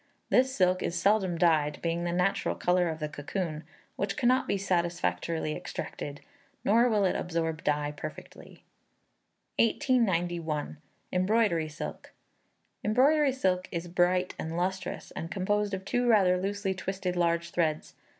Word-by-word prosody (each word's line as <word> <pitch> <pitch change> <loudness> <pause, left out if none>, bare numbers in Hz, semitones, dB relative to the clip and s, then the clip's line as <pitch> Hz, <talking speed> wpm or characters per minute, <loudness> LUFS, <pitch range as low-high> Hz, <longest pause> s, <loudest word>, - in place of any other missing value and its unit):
This 260 +1 +4
silk 185 -6 +2
is 170 - -2
seldom 195 -4 +2
dyed, 155 -3 +2
being 170 +1 -1
the 175 - -1
natural 180 +3 +1
colour 180 -1 +2
of 160 - -3
the 155 -1 -3
cocoon, 155 +2 -4 0.3
which 200 0 -2
cannot 255 +1 +3
be - - +1
satisfactorily 170 -4 -1
extracted; 145 0 -6 0.4
nor 235 +4 +5
will 210 -3 +2
it 185 - +1
absorb 165 -2 -2
dye 150 0 0
perfectly. - - -9 1.0
1891. 175 - +1 0.4
Embroidery 185 -4 +2
Silk. 155 - -7 0.7
Embroidery 275 +6 +4
silk 185 -8 0
is 170 0 -3
bright 180 +1 +1
and 160 +1 -4
lustrous, 185 +1 -3
and 165 - -6
composed 205 +3 0
of 190 0 -8
two 245 +4 0
rather 195 -6 +5
loosely 200 0 -1
twisted 190 -1 -3
large 170 -1 +1
threads. 155 -3 -1
180 Hz, 135 wpm, -29 LUFS, 165-200 Hz, 1.0 s, nor